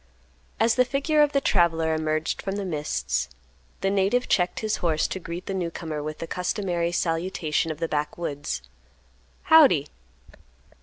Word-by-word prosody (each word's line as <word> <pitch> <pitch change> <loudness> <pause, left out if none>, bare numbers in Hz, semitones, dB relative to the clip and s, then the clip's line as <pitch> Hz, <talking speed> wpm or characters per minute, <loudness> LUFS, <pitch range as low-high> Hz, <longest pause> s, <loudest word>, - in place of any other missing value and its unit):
As 225 +1 +4
the 255 - +4
figure 280 +4 +1
of 295 -1 +4
the 280 - +2
traveler 165 -8 +2
emerged 155 0 -1
from 195 0 -3
the 200 -1 -3
mists, 155 -4 -2 0.5
the 195 - +1
native 200 +6 +1
checked 180 -1 +1
his 215 -1 0
horse 160 -3 +1
to 190 - -4
greet 170 +1 -7
the 195 - -3
newcomer 165 -4 -3
with 155 +1 -5
the - - -5
customary 180 -1 -1
salutation 165 -2 -1
of 155 - -4
the 165 +1 -2
backwoods, 150 -1 -3 0.8
"Howdy." 280 - +6
175 Hz, 150 wpm, -25 LUFS, 160-200 Hz, 0.8 s, Howdy